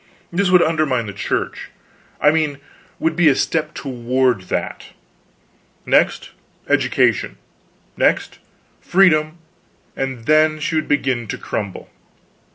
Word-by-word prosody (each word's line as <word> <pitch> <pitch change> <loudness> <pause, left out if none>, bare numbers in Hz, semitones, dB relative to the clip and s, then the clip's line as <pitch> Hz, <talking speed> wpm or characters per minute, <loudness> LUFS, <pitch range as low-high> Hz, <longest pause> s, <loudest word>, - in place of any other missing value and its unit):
This 190 +1 +1
would 180 -1 +6
undermine 155 -7 0
the 100 - -7
Church. 100 - -3 0.5
I 150 - +5
mean 155 -3 0 0.4
would 160 0 -1
be 170 -2 +5
a 135 - +3
step 160 +2 -1
toward 125 -3 0
that. - - -3 1.0
Next, - - +1 0.4
education - - +1 0.6
next, - - 0 0.4
freedom 160 -4 +3 0.6
and 130 -4 -4
then 155 +1 +3
she 155 +1 -2
would 155 -1 0
begin 130 -5 0
to - - -4
crumble. 100 -3 -5
150 Hz, 115 wpm, -19 LUFS, 125-160 Hz, 1.0 s, would